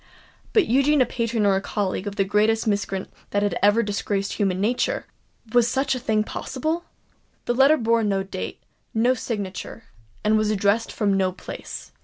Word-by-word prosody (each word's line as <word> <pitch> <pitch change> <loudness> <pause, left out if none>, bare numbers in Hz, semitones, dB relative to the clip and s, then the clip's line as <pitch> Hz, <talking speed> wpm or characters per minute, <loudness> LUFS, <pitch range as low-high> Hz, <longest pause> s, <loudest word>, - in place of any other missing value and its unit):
But 425 -5 +4
Eugene 275 +4 +3
a - - +5
patron 230 -2 -1
or 195 -1 +3
colleague 200 -1 -2
of 200 - -4
the 195 - +2
greatest 215 +3 +2
miscreant 200 -2 -2 0.2
that 205 0 0
had 205 - 0
ever 205 +3 +4
disgraced 200 -1 -2
human 195 -3 0
nature! 245 - 0 0.5
Was 240 -1 +5
such 265 +3 +1
a 255 - -2
thing 220 -3 +1
possible? 315 +10 -3 0.6
The 240 - +1
letter 275 +5 +5
bore 230 -2 +2
no 195 -2 +1
date—no 220 - -2
signature—and 205 - -3
was 215 -1 +1
addressed 210 +2 +1
from 205 -3 +1
no 190 -1 +2
place. 185 - -8
215 Hz, 160 wpm, -24 LUFS, 200-240 Hz, 0.6 s, a